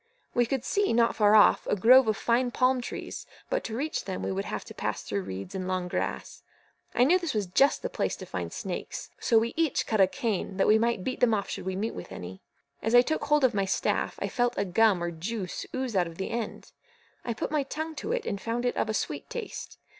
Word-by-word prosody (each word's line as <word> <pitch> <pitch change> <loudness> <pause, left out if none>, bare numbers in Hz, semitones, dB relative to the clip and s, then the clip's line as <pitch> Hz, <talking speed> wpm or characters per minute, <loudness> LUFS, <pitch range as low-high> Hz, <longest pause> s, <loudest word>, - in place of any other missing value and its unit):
We 240 -1 +2
could 265 0 -2
see, 405 - +1
not 230 0 +3
far 210 -1 +5
off, 210 - +6
a - - +2
grove 245 +5 +7
of 215 -2 +1
fine 245 +1 +2
palm 255 +1 +2
trees, - - -6 0.2
but - - 0
to 225 - -4
reach 305 +4 -2
them 95 +1 -4
we 95 - -1
should 95 +1 -2
have - - -4
to - - -10
pass - - -3
through 100 -1 -2
reeds 95 +1 -7
and 185 -1 -3
long 185 -1 -1
grass. - - -3 0.5
I 245 - +5
knew 345 +8 +5
this 340 -8 -3
was 210 -2 +1
just 270 - +3
the - - 0
place - - -1
to - - -9
find - - -4
snakes, - - -5
so 230 - +3
we 230 +1 +2
each 325 -3 +1
cut 215 -3 +2
a 190 - +7
cane, 195 -2 -2
that 195 - +3
we 215 +1 +5
might 230 -4 0
beat 255 - -3
them 230 -3 +4
off 200 - -3
should - - -5
we 190 - -1
meet 215 +4 -2
with - - -8
any. 90 +1 -8 0.4
As 225 +2 +1
I 245 - +8
took 310 +1 -1
hold 295 0 +3
of 260 - +4
my 200 -1 +1
staff, 190 - 0
I - - -2
felt 245 -1 0
a 200 - +1
gum 195 -1 +3
or 175 - -2
juice 185 +3 -5
ooze 260 -4 -2
out 180 -2 +3
of 165 0 -10
the 190 - -4
end. 230 -1 -5 0.5
I 235 - -3
put - - -3
my 305 -1 +2
tongue 315 +4 -4
to 435 - -3
it, 485 -2 -1
and 200 - -3
found 235 +2 -2
it 245 - 0
of - - 0
a 215 - 0
sweet - - -3
taste. 470 -3 -6
225 Hz, 250 wpm, -28 LUFS, 190-255 Hz, 0.5 s, I